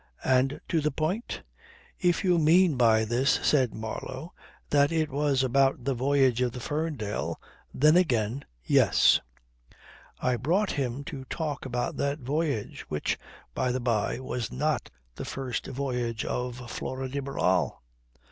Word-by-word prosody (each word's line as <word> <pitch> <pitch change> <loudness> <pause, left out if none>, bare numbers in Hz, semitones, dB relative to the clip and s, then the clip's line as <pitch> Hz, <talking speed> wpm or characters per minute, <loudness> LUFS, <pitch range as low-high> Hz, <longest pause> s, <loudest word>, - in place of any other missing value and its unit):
"And 130 +2 +2
to 165 - +1
the 150 - +1
point?" 160 - -3 0.6
"If 175 -2 +2
you 180 -3 +3
mean 165 +1 +5
by 110 -3 +4
this," 120 +5 +2
said 130 -6 +3
Marlow, 130 +8 -6 0.4
"that 145 +1 +4
it 160 -3 0
was 140 -1 +1
about 135 0 +2
the 135 +2 0
voyage 130 -1 +2
of 125 -2 +1
the 125 - -6
Ferndale, 145 -6 -3 0.3
then 150 +4 +4
again, 125 - +2 0.2
yes. - - +5 1.0
I 125 -1 +1
brought 180 - +1
him 135 0 -2
to 135 -1 -7
talk 145 -2 -4
about 125 -1 -2
that 140 +1 0
voyage, 140 -3 -2
which, 75 -1 -1 0.3
by 130 -1 0
the 130 - -1
by, 115 -4 0
was 125 -3 -4
not 150 +1 -1 0.2
the - - -6
first 130 -3 -4
voyage 125 -4 -2
of 125 0 -3
Flora 130 0 -4
de 140 +2 -3
Barral. 95 - 0
135 Hz, 145 wpm, -28 LUFS, 125-150 Hz, 1.0 s, mean